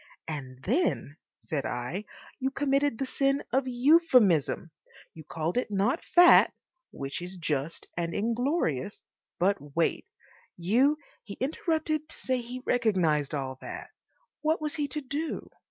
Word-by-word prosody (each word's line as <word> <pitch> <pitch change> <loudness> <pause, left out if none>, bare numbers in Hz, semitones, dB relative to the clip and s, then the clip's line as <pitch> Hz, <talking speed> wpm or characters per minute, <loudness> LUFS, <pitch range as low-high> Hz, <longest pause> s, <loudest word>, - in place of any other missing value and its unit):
"And 130 -4 -6
then," 235 - 0 0.2
said 145 -4 -3
I, 135 +12 -4 0.3
"you 265 0 0
committed 275 -2 +1
the 270 - -1
sin 275 +1 +1
of 265 0 +2
euphuism. 245 - +4 0.4
You 160 - -11
called 160 +6 -3
it 250 - 0
not 210 +9 +1
Fat, 350 0 +7 0.4
which 135 +4 -5
is 180 +2 -7
just 155 -2 -2
and 170 -1 -2
inglorious, 225 - -1 0.3
but 175 -6 0
Weight. 170 - +1 0.5
You—" 245 - +3 0.3
He 200 -2 -8
interrupted 310 - -1
to - - -7
say 255 -1 -1
he 250 +2 -7
recognised 175 - +2
all 130 -2 -4
that. - - -8 0.5
What 315 +1 +1
was 305 -2 -2
he 295 -2 -1
to 300 +2 -4
DO? 290 +4 -4
230 Hz, 140 wpm, -28 LUFS, -, 0.5 s, Fat